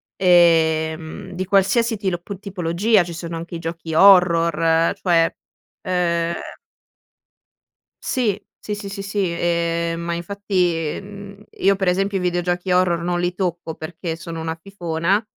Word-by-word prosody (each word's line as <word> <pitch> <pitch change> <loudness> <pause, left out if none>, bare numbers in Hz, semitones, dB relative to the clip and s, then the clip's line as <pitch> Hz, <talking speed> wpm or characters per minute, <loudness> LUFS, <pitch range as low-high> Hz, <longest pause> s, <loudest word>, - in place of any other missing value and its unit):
ehm, 165 0 +2
di 185 +1 -4
qualsiasi 200 +4 +2
tilo 190 -4 -2
p 195 +3 -8
tipologia, 195 +1 +1
ci 170 0 -7
sono 170 0 -6
anche 170 +1 -6
i - - -5
giochi 165 -1 -5
horror 170 -3 +5
cioè, 165 -3 +3 0.5
uhm 170 -2 0 1.7
Sì, 215 -6 0 0.2
sì, 210 - -4
sì, 205 -1 -7
sì, 195 0 -6
sì, 195 0 -1
ehm, 170 0 0
ma 170 0 -2
infatti, 175 -3 -1
mhmm, 200 0 -11
io, 195 +1 +2
per 190 -1 -1
esempio, 195 +2 +1
i - - -4
videogiochi 175 0 -1
horror 180 -2 +2
non 175 0 -1
li 175 0 -1
tocco 175 -3 -3
perché 165 +1 -5
sono 165 0 -7
una 160 0 -3
fifona, 175 +2 -1
175 Hz, 140 wpm, -21 LUFS, 165-195 Hz, 1.7 s, horror